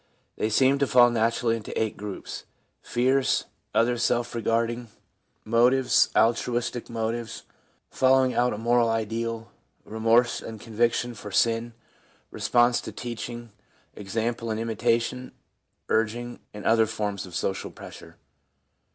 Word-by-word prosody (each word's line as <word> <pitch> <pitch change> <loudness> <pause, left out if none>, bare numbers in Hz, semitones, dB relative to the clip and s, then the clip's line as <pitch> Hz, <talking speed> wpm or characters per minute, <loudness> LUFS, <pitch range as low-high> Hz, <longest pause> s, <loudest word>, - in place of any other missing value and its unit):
They 110 - -1
seem 135 +5 +3
to 140 - +2
fall 120 -1 +6
naturally 115 0 +1
into 110 -2 -5
eight 110 -1 -1
groups 100 -1 -7 0.2
— - - -44
fears, 130 +2 +1 0.3
other 120 +1 +2
self 120 0 0
regarding 115 +1 -1 0.6
motives, 125 +3 +4
altruistic 120 +1 +1
motives, 115 0 -4 0.5
following 130 0 +3
out 125 +1 +2
a 105 - -4
moral 120 +1 +2
ideal, 115 +1 -3 0.3
remorse 115 +2 +2
and 110 -1 -8
conviction 120 +2 0
for 105 -2 -9
sin, 115 +3 +1 0.6
response 120 0 +2
to - - -7
teaching, 120 -1 -6 0.4
example 115 +3 -3
and 110 0 -2
imitation, 115 +2 -1 0.5
urging 120 +2 -1
and 105 -1 -9
other 110 0 +4
forms 105 -3 -3
of 90 - -10
social 95 - -2
pressure. - - -12
115 Hz, 125 wpm, -26 LUFS, 110-120 Hz, 0.6 s, fall